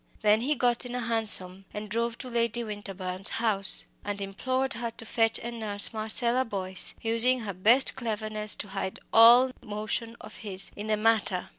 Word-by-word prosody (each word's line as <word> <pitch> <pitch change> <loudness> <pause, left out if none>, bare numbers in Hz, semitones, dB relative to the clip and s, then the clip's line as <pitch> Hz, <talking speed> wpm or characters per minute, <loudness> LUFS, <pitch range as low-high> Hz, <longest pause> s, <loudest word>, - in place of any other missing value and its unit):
Then 210 +1 +3
he 290 +5 0
got 245 -2 0
into 245 0 -6
a - - -3
hansom, 205 -5 +3
and 210 0 -6
drove 230 +2 -2
to 255 - -9
Lady 235 -1 -1
Winterbourne's 195 -3 -6
house, 210 -4 0 0.2
and 205 0 -5
implored 255 +7 -2
her 235 0 -4
to 225 0 -11
fetch 225 0 +1
and 235 0 -6
nurse 205 -1 -1
Marcella 235 +3 +1
Boyce, 190 -5 -3
using 235 +3 +4
her 205 -3 -5
best 225 +9 +4
cleverness 215 -3 -2
to 205 - -8
hide 195 -1 -5
all 240 +3 +7
motion 215 +2 -4
of - - -11
his 195 -3 -1
in 205 +1 -7
the 215 -1 0
matter. 210 -4 0
220 Hz, 175 wpm, -27 LUFS, 205-235 Hz, 0.2 s, all